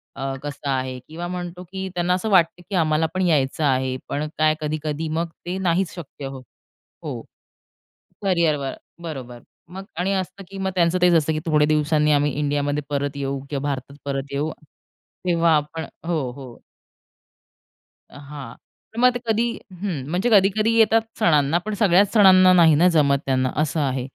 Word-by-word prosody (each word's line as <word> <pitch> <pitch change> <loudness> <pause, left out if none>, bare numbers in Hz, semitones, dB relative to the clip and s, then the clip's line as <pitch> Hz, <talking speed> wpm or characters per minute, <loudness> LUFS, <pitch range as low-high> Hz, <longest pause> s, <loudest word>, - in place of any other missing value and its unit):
अ, 135 0 -3
कसं 145 0 -5
आहे 130 -1 -2
किंवा 170 +3 -6
म्हणतो 180 0 -6
की 190 +2 -6
त्यांना 175 +1 +1
असं 185 +4 -1
वाटतं 175 -2 +3
की 200 - -3
आम्हाला 160 -2 +2
पण 185 - -1
यायचं 150 -2 +1
आहे 130 -2 +1
पण 150 +2 -2
काय 155 0 +3
कधी-कधी 155 +1 -3
मग 170 0 -1 0.2
ते 180 +2 -3
नाहीच 185 0 0
शक्य 145 -4 -9
होत. 135 -1 -7 0.6
हो, - - -4 1.0
करिअरवर 165 -8 +1 0.3
बरोबर. 130 -7 -7 0.3
मग 190 +2 -8
आणि 190 +2 0
असतं 190 +1 -4
की 195 - -9
मग 190 0 -1
त्यांचं 175 0 +2
तेच 180 -1 +5
असतं 160 -1 +2
की 155 - -2
थोड्या 150 -2 +3
दिवसांनी 150 0 +2
आम्ही 145 -1 +2
इंडियामध्ये 145 0 0
परत 140 0 -2
येऊ 140 -1 -3
किंवा 140 -2 -3
भारतात 140 0 -4
परत 140 0 -4
येऊ 145 +3 -1 0.8
तेव्हा 170 -2 +3
आपण 150 +2 -3 0.2
हो, 155 -7 -1
हो. 130 -4 -11 1.5
अ, - - -14
हां. 140 -6 -8 0.4
तर 230 - -5
मग 250 0 +5
ते 245 - -3
कधी, 225 +2 +2 0.3
हं 160 -10 -3
म्हणजे 185 +8 0
कधी-कधी 205 +3 +4
येतात 225 0 +5 0.2
सणांना 150 -1 +3
पण 215 - -3
सगळ्याच 200 -1 +4
सणांना 185 -4 +7
नाही 165 -4 +6
ना 175 +5 +5
जमत 140 -2 +3
त्यांना. 130 -1 +1
असं 155 +1 -1
आहे. 130 -2 -1
155 Hz, 170 wpm, -22 LUFS, 140-180 Hz, 1.5 s, सणांना